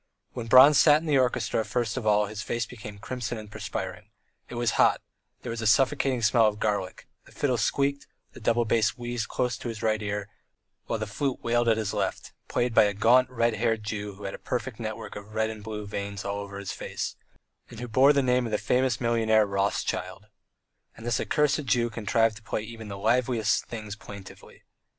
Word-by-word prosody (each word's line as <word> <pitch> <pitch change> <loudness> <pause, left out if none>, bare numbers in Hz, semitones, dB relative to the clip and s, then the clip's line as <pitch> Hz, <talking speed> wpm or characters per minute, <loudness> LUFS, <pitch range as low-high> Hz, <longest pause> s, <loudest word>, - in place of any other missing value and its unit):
When 120 -2 -5
Bronze 130 +4 +8
sat 150 -1 +6
in 165 - -9
the 145 -4 +3
orchestra 120 -3 +1
first 115 +1 -2
of 110 - -3
all 105 0 +4
his 105 +1 -6
face 120 +1 -2
became 105 -4 -10
crimson 120 +1 -4
and 105 -1 -10
perspiring; - - -5 0.4
it - - -7
was 120 -1 +1
hot, - - +4 0.4
there - - -4
was 115 0 -4
a 110 - 0
suffocating 135 0 +2
smell 110 +1 +5
of 105 0 -2
garlic, 100 -4 -2 0.2
the - - -18
fiddle 135 -3 0
squeaked, 140 +6 0 0.3
the - - -11
double 115 +1 +1
bass 110 -1 +1
wheezed 120 -2 -3
close 125 -2 -1
to - - -6
his 110 -2 -6
right 110 -1 +1
ear, 105 -1 -3 0.6
while 115 - -1
the 110 - -3
flute 130 +5 -3
wailed 120 0 +1
at 110 - +3
his 110 -3 -2
left, - - -3
played 120 -1 0
by 110 - +6
a 100 -1 -1
gaunt, 125 +5 +4
red 120 -2 +1
haired 110 0 0
Jew 105 -1 -4
who 100 - -12
had 95 - -4
a - - -8
perfect 125 -2 -4
network 110 -2 -6
of 105 +1 -10
red 110 0 +1
and 110 -1 -10
blue 105 -1 -5
veins 100 0 -5
all 100 0 -2
over 100 0 -7
his 100 -1 -5
face, - - -5 0.5
and 115 - -10
who 125 - -5
bore 130 +5 +5
the 140 -2 +2
name 125 -1 +2
of - - -6
the 105 - +2
famous 125 +1 +1
millionaire 110 -2 +3
Rothschild. 100 0 -2 0.7
And 115 - -10
this 120 - 0
accursed 150 -1 +1
Jew 120 -2 +1
contrived 115 0 +1
to - - -14
play 110 -1 -3
even 110 -1 -9
the 100 -1 -6
liveliest 115 +1 +1
things 110 -3 -6
plaintively. 100 -2 -12
110 Hz, 210 wpm, -27 LUFS, 105-125 Hz, 0.7 s, Bronze